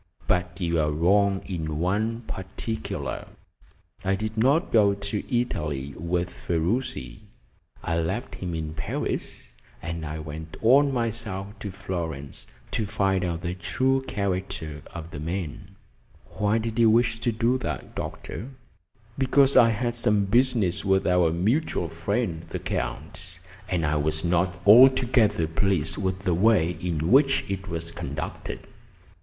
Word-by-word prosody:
But 90 Hz, +1 st, 0 dB
you 85 Hz, -2 st, +1 dB
are 75 Hz, -1 st, +2 dB
wrong 95 Hz, +6 st, +2 dB
in 80 Hz, -5 st, -3 dB
one 105 Hz, +7 st, 0 dB
particular. 110 Hz, +1 st, -5 dB, 0.8 s
I 95 Hz, +1 st, +2 dB
did 110 Hz, +2 st, -4 dB
not 135 Hz, +10 st, +2 dB
go 100 Hz, -3 st, +5 dB
to 100 Hz, +4 st, -1 dB
Italy 75 Hz, -, -3 dB
with 85 Hz, +2 st, -1 dB
Ferruci 85 Hz, -, -2 dB, 0.6 s
I 85 Hz, 0 st, 0 dB
left 95 Hz, +10 st, -2 dB
him 90 Hz, -3 st, -4 dB
in 80 Hz, -1 st, -4 dB
Paris, 75 Hz, -4 st, -4 dB, 0.3 s
and 85 Hz, 0 st, -5 dB
I 75 Hz, 0 st, -4 dB
went 80 Hz, +2 st, -7 dB
on 140 Hz, +5 st, +6 dB
myself 115 Hz, -5 st, -2 dB
to 105 Hz, -, -5 dB
Florence 85 Hz, -7 st, -5 dB, 0.2 s
to 110 Hz, -, -1 dB
find 95 Hz, -2 st, +1 dB
out 85 Hz, -2 st, -2 dB
the 90 Hz, -1 st, -2 dB
true 130 Hz, +11 st, 0 dB
character 90 Hz, -6 st, -3 dB
of 85 Hz, -1 st, -8 dB
the 75 Hz, -, -6 dB
man." 95 Hz, +4 st, -5 dB, 0.6 s
"Why 105 Hz, +2 st, +1 dB
did 115 Hz, 0 st, -2 dB
you 115 Hz, -1 st, +6 dB
wish 115 Hz, 0 st, +3 dB
to 120 Hz, +1 st, 0 dB
do 115 Hz, +3 st, +1 dB
that, 75 Hz, -, -5 dB
doctor?" 120 Hz, -, -6 dB, 0.7 s
"Because 135 Hz, +1 st, +4 dB
I 115 Hz, -, +8 dB
had 120 Hz, +2 st, -1 dB
some 105 Hz, -3 st, +2 dB
business 115 Hz, -4 st, +2 dB
with 95 Hz, -1 st, +2 dB
our 90 Hz, -2 st, +3 dB
mutual 95 Hz, -, 0 dB
friend, 85 Hz, +1 st, -2 dB
the -, -, -6 dB
Count, 95 Hz, -1 st, -4 dB, 0.3 s
and 85 Hz, -3 st, 0 dB
I 75 Hz, +1 st, +1 dB
was 80 Hz, +1 st, -1 dB
not 90 Hz, +1 st, +1 dB
altogether 120 Hz, -4 st, +6 dB
pleased 80 Hz, 0 st, +1 dB
with 95 Hz, -1 st, -1 dB
the 90 Hz, -2 st, +1 dB
way 90 Hz, -2 st, +4 dB
in 85 Hz, -1 st, -1 dB
which 135 Hz, 0 st, +5 dB
it 95 Hz, 0 st, -4 dB
was 85 Hz, -1 st, -3 dB
conducted. 75 Hz, +1 st, -5 dB
95 Hz, 140 wpm, -26 LUFS, 85-110 Hz, 0.8 s, I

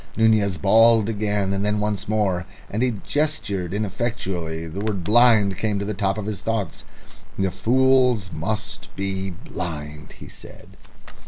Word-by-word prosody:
Nunez 110 Hz, -4 st, +3 dB
bawled 110 Hz, +5 st, +5 dB
again, 105 Hz, -2 st, -1 dB
and 100 Hz, 0 st, -1 dB
then 105 Hz, 0 st, +1 dB
once 105 Hz, -1 st, -2 dB
more, 100 Hz, -5 st, 0 dB, 0.2 s
and 105 Hz, -, -1 dB
as 130 Hz, -, +3 dB
he 115 Hz, -, -4 dB
gestured 100 Hz, -, -1 dB
ineffectually 95 Hz, -6 st, -3 dB
the 80 Hz, +5 st, -6 dB
word 100 Hz, -3 st, -2 dB
"blind" 110 Hz, -2 st, +5 dB
came 110 Hz, -2 st, 0 dB
up 100 Hz, -, -2 dB
to -, -, -2 dB
the 105 Hz, -, -2 dB
top 95 Hz, 0 st, -1 dB
of 105 Hz, -, -4 dB
his 105 Hz, -2 st, -4 dB
thoughts. 110 Hz, -6 st, -3 dB, 0.5 s
"The 95 Hz, -1 st, 0 dB
fools 125 Hz, -4 st, +3 dB
must 105 Hz, +6 st, -4 dB
be 95 Hz, 0 st, -2 dB
blind," 75 Hz, -4 st, -7 dB
he -, -, -12 dB
said. -, -, -13 dB
100 Hz, 160 wpm, -23 LUFS, 95-110 Hz, 0.5 s, bawled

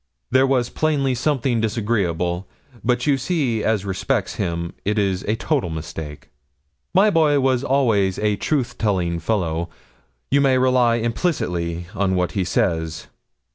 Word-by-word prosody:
There 130 Hz, +1 st, +4 dB
was 125 Hz, -3 st, +1 dB
plainly 145 Hz, -4 st, +1 dB
something 130 Hz, -3 st, 0 dB
disagreeable; 100 Hz, -5 st, -1 dB, 0.4 s
but 125 Hz, +1 st, +1 dB
you 140 Hz, -2 st, +2 dB
see 130 Hz, -7 st, 0 dB
as 105 Hz, -3 st, 0 dB
respects 100 Hz, +3 st, -1 dB
him 85 Hz, -3 st, -2 dB
it 105 Hz, +2 st, -1 dB
is 95 Hz, -3 st, +1 dB
a 105 Hz, -, +1 dB
total 130 Hz, -, -1 dB
mistake. 80 Hz, -2 st, -7 dB, 0.6 s
My 200 Hz, +4 st, +4 dB
boy 155 Hz, -5 st, +3 dB
was 130 Hz, -1 st, +1 dB
always 115 Hz, -9 st, +2 dB
a 105 Hz, -1 st, +1 dB
truth 125 Hz, +1 st, -2 dB
telling 90 Hz, -6 st, 0 dB
fellow 85 Hz, -3 st, -1 dB, 0.6 s
you 140 Hz, +1 st, +4 dB
may 135 Hz, -2 st, +4 dB
rely 125 Hz, -2 st, +3 dB
implicitly 90 Hz, -, -1 dB
on 95 Hz, -1 st, 0 dB
what 90 Hz, -1 st, 0 dB
he 95 Hz, -, -1 dB
says. 80 Hz, -3 st, -1 dB
110 Hz, 140 wpm, -21 LUFS, 90-130 Hz, 0.6 s, There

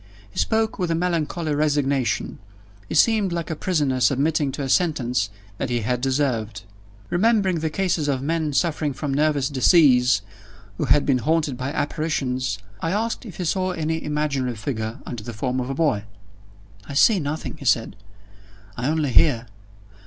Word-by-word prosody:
He -, -, -5 dB
spoke 220 Hz, -1 st, 0 dB
with 180 Hz, -2 st, 0 dB
a 165 Hz, -, +1 dB
melancholy 165 Hz, -2 st, -1 dB
resignation 140 Hz, -5 st, 0 dB, 0.5 s
he -, -, -3 dB
seemed 210 Hz, +2 st, +4 dB
like 170 Hz, -1 st, -3 dB
a -, -, -2 dB
prisoner 145 Hz, -7 st, 0 dB
submitting 140 Hz, +3 st, +2 dB
to 145 Hz, -, -4 dB
a -, -, -2 dB
sentence 125 Hz, -, +1 dB, 0.3 s
that 135 Hz, -, -2 dB
he 120 Hz, -1 st, 0 dB
had 125 Hz, +3 st, -1 dB
deserved. 125 Hz, -6 st, -1 dB, 0.5 s
Remembering 195 Hz, -2 st, +2 dB
the 160 Hz, 0 st, -1 dB
cases 170 Hz, -3 st, 0 dB
of 135 Hz, -2 st, +1 dB
men 160 Hz, 0 st, 0 dB
suffering 150 Hz, -1 st, 0 dB
from 140 Hz, +1 st, -3 dB
nervous 145 Hz, -2 st, +2 dB
disease 130 Hz, -, +4 dB, 0.6 s
who -, -, +1 dB
had 140 Hz, +3 st, +4 dB
been 130 Hz, -3 st, +2 dB
haunted 155 Hz, +1 st, 0 dB
by 130 Hz, +2 st, -4 dB
apparitions, 135 Hz, -7 st, -1 dB, 0.2 s
I 165 Hz, -, -2 dB
asked 225 Hz, +5 st, -2 dB
if 185 Hz, -, -10 dB
he 180 Hz, -, -3 dB
saw 185 Hz, +2 st, 0 dB
any 160 Hz, -1 st, -2 dB
imaginary 145 Hz, -5 st, -1 dB
figure 110 Hz, -1 st, -4 dB
under 120 Hz, -3 st, -6 dB
the 120 Hz, -, -6 dB
form 125 Hz, +4 st, -2 dB
of 125 Hz, +1 st, -3 dB
a 135 Hz, -, -2 dB
boy. 130 Hz, -10 st, +1 dB, 0.8 s
"I 140 Hz, -, -5 dB
see 200 Hz, +7 st, +5 dB
nothing," 155 Hz, 0 st, -4 dB
he 140 Hz, -, -10 dB
said; 115 Hz, -5 st, +2 dB, 0.8 s
"I 125 Hz, +1 st, -2 dB
only 155 Hz, -3 st, 0 dB
hear. 125 Hz, -3 st, +4 dB
145 Hz, 165 wpm, -23 LUFS, 130-165 Hz, 0.8 s, see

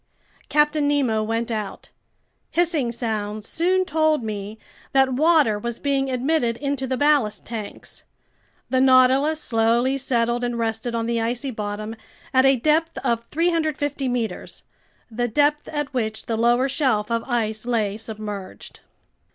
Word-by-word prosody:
Captain 295 Hz, 0 st, +2 dB
Nemo 265 Hz, -7 st, +1 dB
went 225 Hz, +2 st, -2 dB
out. 215 Hz, -3 st, -5 dB, 0.6 s
Hissing 325 Hz, -8 st, +1 dB
sounds 215 Hz, -3 st, -3 dB
soon 370 Hz, +3 st, +1 dB
told 315 Hz, -5 st, +1 dB
me 210 Hz, 0 st, -5 dB, 0.4 s
that 265 Hz, -1 st, +4 dB
water 295 Hz, -6 st, +3 dB
was 235 Hz, +2 st, -4 dB
being 275 Hz, -1 st, 0 dB
admitted 255 Hz, -2 st, 0 dB
into 275 Hz, 0 st, -2 dB
the 260 Hz, 0 st, -1 dB
ballast 280 Hz, -9 st, +2 dB
tanks. 220 Hz, -3 st, -8 dB, 0.7 s
The 260 Hz, -1 st, +3 dB
Nautilus 265 Hz, +4 st, +4 dB
slowly 235 Hz, +2 st, +1 dB
settled 240 Hz, -2 st, 0 dB
and 240 Hz, -1 st, -1 dB
rested 230 Hz, +1 st, -2 dB
on 230 Hz, 0 st, -1 dB
the 235 Hz, 0 st, 0 dB
icy 245 Hz, +4 st, -2 dB
bottom 215 Hz, 0 st, -5 dB, 0.4 s
at 260 Hz, +1 st, +5 dB
a 270 Hz, -, +5 dB
depth 310 Hz, +6 st, +1 dB
of 235 Hz, 0 st, 0 dB
350 310 Hz, -4 st, -1 dB
meters, 245 Hz, -3 st, -4 dB, 0.5 s
the 240 Hz, +2 st, -1 dB
depth 295 Hz, +5 st, +1 dB
at 295 Hz, -2 st, -4 dB
which 220 Hz, -3 st, -2 dB
the 230 Hz, -, -1 dB
lower 240 Hz, +3 st, +3 dB
shelf 255 Hz, -6 st, 0 dB
of 230 Hz, 0 st, 0 dB
ice 225 Hz, -2 st, -2 dB
lay 215 Hz, -4 st, 0 dB
submerged. 210 Hz, -3 st, -8 dB
245 Hz, 140 wpm, -23 LUFS, 225-285 Hz, 0.7 s, at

